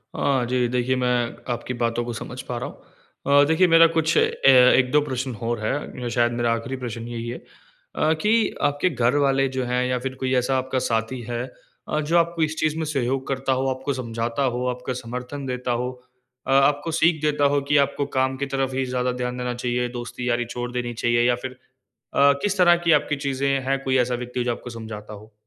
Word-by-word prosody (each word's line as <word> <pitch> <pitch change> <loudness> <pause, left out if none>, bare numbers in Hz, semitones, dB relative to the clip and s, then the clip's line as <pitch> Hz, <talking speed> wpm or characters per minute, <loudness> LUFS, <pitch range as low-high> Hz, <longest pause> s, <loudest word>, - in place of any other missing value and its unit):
हाँ 135 -3 +1
जी। 125 0 +1
देखिए, 125 +1 0
मैं 125 -2 0 0.2
आपकी 125 +1 -5
बातों 120 0 -1
को 120 - -4
समझ 125 +3 -7
पा 125 - -2
रहा 120 - -4
हूँ। 140 +1 -2
अ, - - +6
देखिए 160 +4 +4
मेरा 165 0 +7
कुछ 160 0 +2
अे - - +5 0.5
1-2 130 +3 +3
प्रश्न 130 -2 -3
हौर 115 0 -1
है। 125 -1 -3
शायद 120 0 +2
मेरा 120 0 0
आख़िरी 115 +3 -4
प्रश्न 115 -2 -6
यही 120 -1 -5
है 120 - -5
अ, - - -4
कि 220 +3 +2
आपके 145 +5 +1
घर 125 -3 +1
वाले 135 0 +2
जो 130 - 0
हैं 125 +1 0
या 125 0 0
फ़िर 130 +1 -5
कोई 130 0 -1
ऐसा 125 +1 +1
आपका 130 0 -1
साथी 115 +2 -1
है 120 0 -2 0.4
अ, 155 - -1
जो 155 +3 +1
आपको 170 0 +1
इस 155 +1 -2
चीज़ 155 0 0
में 160 - -2
सहयोग 135 -3 -1
करता 135 0 0
हो, 130 +1 0
आपको 130 +2 -2
समझाता 115 0 -3
हो, 125 -1 -1
आपका 125 +1 -3
समर्थन 125 +3 -6
देता 125 -1 -3
हो 125 - -2 0.6
अ, - - 0
आपको 145 +4 +3
सीख 165 -2 +3
देता 150 -1 +1
हो 140 - +2
कि 145 - +5
आपको 140 - -4
काम 130 0 +1
की 140 - -2
तरफ़ 135 -1 -1
ही 135 0 0
ज़्यादा 125 0 -1
ध्यान 125 0 -3
देना 125 0 -2
चाहिए, 125 0 -1
दोस्ती 120 +1 -5
यारी 120 0 +1
छोड़ 120 +1 -5
देनी 120 -1 -3
चाहिए 120 +1 +1
या 125 - +3
फ़िर 130 +1 -7 0.6
अ, 140 0 +5
किस 205 -1 0
तरह 175 -2 +6
की 165 - +4
आपकी 150 - -2
चीज़ें 140 0 0 0.2
हैं 135 0 +1
कोई 130 -1 +1
ऐसा 125 0 +1
व्यक्ति 125 0 -3
जो 120 - 0
आपको 120 - -6
समझाता 110 -2 -8
हो? 105 +2 -12
125 Hz, 215 wpm, -23 LUFS, 120-140 Hz, 0.6 s, मेरा